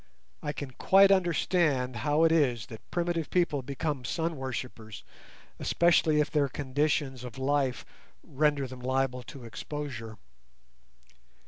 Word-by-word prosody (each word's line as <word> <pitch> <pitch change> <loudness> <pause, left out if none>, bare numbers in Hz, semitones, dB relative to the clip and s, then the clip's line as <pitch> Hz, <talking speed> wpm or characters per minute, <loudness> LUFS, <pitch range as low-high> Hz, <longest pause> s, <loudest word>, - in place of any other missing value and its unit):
I 150 - -2
can 145 -2 -6
quite 195 +9 +5
understand 165 -8 +2
how 145 +7 +2
it 165 - +5
is 130 -8 +2
that 110 - -12
primitive 170 -2 -1
people 170 -6 +1
become 140 +1 -3
sun 165 +6 -2
worshippers, 125 -6 -6 0.6
especially 165 -3 +3
if 150 - +1
their 145 -3 +2
conditions 140 -1 -1
of 125 -2 -8
life 135 -1 0 0.4
render 145 0 +1
them 130 0 -9
liable 130 0 0
to 125 +2 -11
exposure. 115 -1 -6
140 Hz, 125 wpm, -29 LUFS, 125-155 Hz, 0.6 s, quite